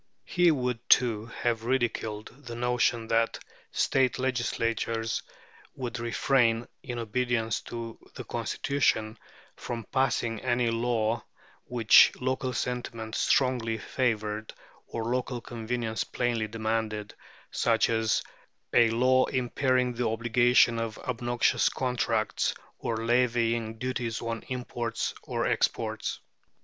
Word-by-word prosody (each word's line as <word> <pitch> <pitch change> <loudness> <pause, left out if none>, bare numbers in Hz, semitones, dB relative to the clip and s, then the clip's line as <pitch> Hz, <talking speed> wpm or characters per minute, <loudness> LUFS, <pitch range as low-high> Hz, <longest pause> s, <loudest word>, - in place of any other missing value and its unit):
He 175 -1 +3
would, 125 -6 0
too, 115 -3 +4
have 115 -1 -2
ridiculed 115 -4 -1 0.2
the 120 - -5
notion 120 -1 +1
that 115 0 +2 0.3
State 130 -2 +2
legislatures 115 -3 -1 0.5
would 120 -3 -4
refrain, 120 0 +2
in 125 -3 -5
obedience 115 -1 -1
to 115 -1 -6 0.2
the - - -6
Constitution, 110 -6 0 0.4
from 115 -1 -5
passing 120 -4 +1
any 120 -1 +1
law 115 -1 0 0.4
which 115 -3 +6
local 130 0 -1
sentiment 120 -2 -3
strongly 125 -5 +2
favoured 110 -2 -2 0.3
or 115 -1 -4
local 125 +1 -1
convenience 115 -1 -3
plainly 120 -3 -1
demanded, 110 -1 -2 0.4
such 115 -2 +2
as 110 -2 +1 0.5
a 115 -1 +6
law 130 +3 +4
impairing 130 0 +1
the 120 +1 -1
obligation 120 +1 +3
of 115 -1 -3
obnoxious 120 -1 +1
contracts, 120 -4 0 0.2
or 115 0 -2
levying 115 -2 +1
duties 120 -2 -2
on 115 -1 -3
imports 120 -2 -3
or - - -2
exports. - - -1
120 Hz, 110 wpm, -28 LUFS, 115-125 Hz, 0.5 s, which